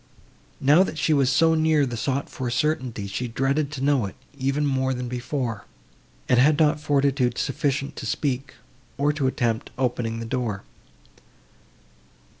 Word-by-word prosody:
Now 145 +6 +5
that 190 -4 -1
she 155 +1 +2
was 135 -3 +3
so 160 +4 +4
near 155 -2 +3
the 120 -2 -4
sought 135 +4 -1
for 130 -2 -4
certainty, 125 -5 -1
she 100 +6 -3
dreaded 135 +5 0
to 135 -3 -4
know 140 -7 +2
it, 95 - -10 0.2
even 140 +2 0
more 130 -1 0
than 125 0 -4
before, 125 -3 -3 0.6
and 125 - +4
had 145 +3 +5
not 150 -1 +3
fortitude 140 -4 +1
sufficient 140 0 -1
to - - -5
speak, 135 -2 -2 0.4
or 145 +1 +2
to 145 -3 0
attempt 115 -3 -1
opening 120 -3 -1
the 115 - -5
door. 115 -5 -2
135 Hz, 155 wpm, -24 LUFS, 125-145 Hz, 0.6 s, Now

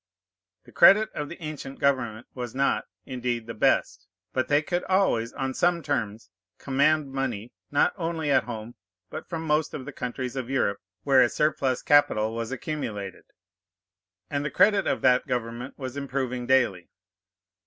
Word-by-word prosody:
The 120 - -17
credit 215 - +6
of 150 -1 -4
the 170 - -9
ancient 150 -3 -6
government 120 -5 0
was 125 -1 -6
not, 140 +1 +1 0.2
indeed, 125 -3 -3
the 115 - -6
best; 105 -3 +1 0.3
but 130 - 0
they 145 +1 +3
could 175 +3 -1
always, 185 -12 +2
on 135 0 -3
some 175 +1 +1
terms, 110 -9 -3 0.3
command 140 +1 +1
money, 125 -5 -3 0.2
not 145 - +2
only 165 -4 -2
at - - +3
home, 115 -1 -7 0.4
but 155 - -7
from 165 -2 -4
most 150 0 +1
of 130 - -6
the - - -6
countries 125 +1 -4
of 130 -2 -4
Europe 100 -7 0 0.2
where 135 -2 +5
a 120 - +4
surplus 140 -4 0
capital 115 -7 +3
was 115 0 -4
accumulated; 115 -9 -5 1.0
and 145 -1 -2
the 150 - -2
credit 205 -2 +3
of - - 0
that 125 -1 +3
government 120 +1 -4
was 130 -2 -6
improving 130 -3 -3
daily. 120 -10 +2
130 Hz, 160 wpm, -26 LUFS, 120-145 Hz, 1.0 s, credit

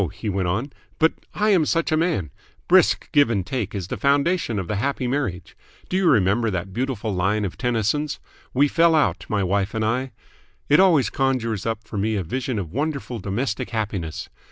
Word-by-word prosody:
he 110 - -5
went 95 -2 -1
on. 115 +11 -2 0.2
"But 160 +1 +3 0.2
I 210 +1 +2
am 180 -5 +4
such 165 +2 0
a - - +3
man. 155 - 0 0.4
Brisk - - +4
give 145 -5 +4
and 100 -6 -1
take 110 -2 -3
is 95 -3 -4
the - - -3
foundation 140 - +1
of 95 -3 -3
the 105 - -2
happy 130 +3 -1
marriage. 125 -9 -3 0.3
Do - - -2
you 185 -2 +3
remember 110 0 +3
that 95 0 -4
beautiful 120 -3 -2
line 100 +3 +1
of 95 - -5
Tennyson's 125 +5 -1 0.3
'We 140 +3 +3
fell 165 +1 +4
out, 95 - +1
my 100 -2 +1
wife 100 +3 0
and 110 -1 0
I'? 125 +4 -1 0.6
It 150 - +6
always 170 -9 +4
conjures 115 -6 -1
up 115 -1 -2
for 110 -2 -5
me 110 +2 0
a 100 - -1
vision 125 +6 -3
of 90 -6 -4
wonderful 140 -3 -3
domestic 105 +4 -2
happiness. 100 -8 -3
115 Hz, 195 wpm, -23 LUFS, 100-140 Hz, 0.6 s, It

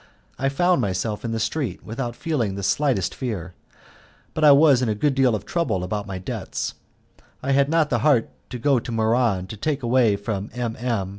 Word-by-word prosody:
I 135 +1 +1
found 175 +6 +2
myself 105 +2 -2
in 115 - -3
the 115 - -2
street 120 - -2
without 120 +1 -4
feeling 120 -12 -1
the 100 - -5
slightest 130 -3 +1
fear, 95 -9 -5 0.8
but 155 - -2
I 150 - +9
was 140 -2 +6
in 125 - 0
a 105 - 0
good 140 +7 +1
deal 130 -4 +3
of 105 -1 -6
trouble 170 - -1
about 105 +2 -3
my 95 -1 -5
debts. 90 - -4 0.7
I 135 - 0
had 140 +1 +3
not 160 -1 +2
the - - +2
heart 140 -7 +3 0.2
to 125 - -5
go 135 +1 +2
to 120 - -7
Muran 110 -4 +1
to 100 - -8
take 145 +5 -2
away 120 -3 +3
from 100 0 -4
M. 120 -2 -2
M. 115 -6 -1
120 Hz, 205 wpm, -23 LUFS, 105-140 Hz, 0.8 s, I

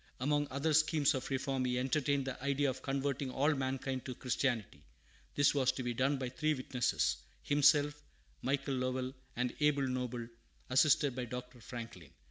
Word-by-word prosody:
Among 145 +2 +1
other 140 +4 0
schemes 155 -1 +4
of 130 -1 -3
reform 135 -1 -1
he 125 -1 0
entertained 140 +1 +1
the 130 -1 -5
idea 140 0 +1
of 130 +1 -9
converting 135 0 -1
all 145 +4 +2
mankind 130 -1 -2
to 130 - -5
Christianity. 120 - -1 0.5
This 145 -1 +4
was 130 -3 +3
to 130 - -4
be 120 0 -1
done 135 +4 +1
by 130 -2 -3
three 155 +4 0
witnesses, 130 -2 0 0.3
himself, 145 0 +4 0.5
Michael 135 +1 0
Lovell, 130 0 -2 0.2
and 125 0 -1
Abel 145 -2 +3
Noble, 125 -2 -3 0.4
assisted 140 0 +4
by 125 -1 -3
Dr. 125 +1 -7
Franklin. 115 0 -8
130 Hz, 160 wpm, -34 LUFS, 125-145 Hz, 0.5 s, schemes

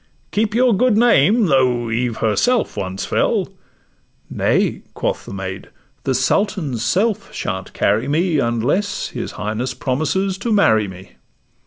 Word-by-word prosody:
Keep 210 0 0
your 245 -2 +4
good 245 +1 +3
name; 225 - +4
though 125 -6 +2
Eve 120 0 -1
herself 215 - +1
once 95 0 -4
fell.' - - 0 0.8
'Nay,' - - +1
quoth - - -2
the - - -7
maid, 95 0 -6 0.4
'the 130 - +1
Sultan's 155 - 0
self 195 - 0
shan't 95 -1 -4
carry 110 +6 +1
me, 160 +2 +1
Unless 125 - 0
his - - -6
highness 110 +5 -3
promises 160 +10 -1
to 230 +3 -2
marry 110 - +3
me. 95 0 -11
135 Hz, 135 wpm, -19 LUFS, -, 0.8 s, your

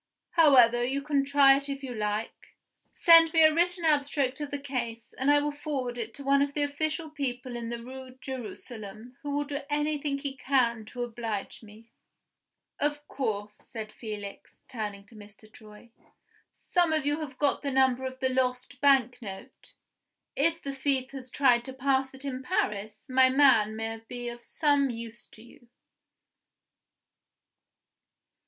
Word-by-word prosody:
However, 250 -8 +6
you 275 +3 -1
can 285 -2 +1
try 275 -1 +6
it 280 0 -4
if 275 0 -5
you 255 -2 -5
like. 210 0 -4 0.4
Send 330 -1 +7
me 325 -1 +6
a 310 0 +6
written 350 +1 +1
abstract 285 -3 +1
of 295 - -3
the 285 - -3
case, 240 -5 -5
and 265 +2 -1
I 290 - +6
will 295 0 -1
forward 285 -4 -4
it 230 -2 -5
to 280 - -9
one 275 0 +3
of 285 0 -1
the 295 - +1
official 310 +2 -2
people 255 -4 -4
in 235 -1 -5
the 235 0 -5
Rue 260 0 -10
Jerusalem, 240 -3 -8
who 290 - -6
will 290 +1 0
do 285 0 -5
anything 295 -1 -1
he 275 -1 -5
can 250 -4 +1
to 245 +3 -5
oblige 225 -4 -5
me. 220 +1 -16 0.9
Of 295 0 -1
course," 210 -6 -3
said 215 0 -9
Felix, 210 -3 -9
turning 210 -5 -6
to 205 - -20
Mr. 215 0 -15
Troy, 215 +2 -15 0.6
"some 350 -2 0
of 310 -3 0
you 295 +2 0
have 285 -4 -7
got 290 -1 +1
the 285 - -2
number 260 -1 +2
of 260 0 -5
the 260 - +2
lost 255 +1 -1
bank 260 -3 +3
note? 195 -3 -10 0.6
If 330 +3 +1
the 275 - -4
thief 270 -1 -1
has 260 -2 -8
tried 245 -3 +3
to 265 - -6
pass 265 0 0
it 265 +1 -10
in 260 -2 -4
Paris, 215 -4 -2
my 260 0 +5
man 255 -6 +4
may 225 0 -4
be 245 -1 -5
of 240 0 -9
some 285 -1 +1
use 235 0 -7
to 220 - -15
you." 240 0 -19
260 Hz, 165 wpm, -28 LUFS, 235-285 Hz, 0.9 s, Send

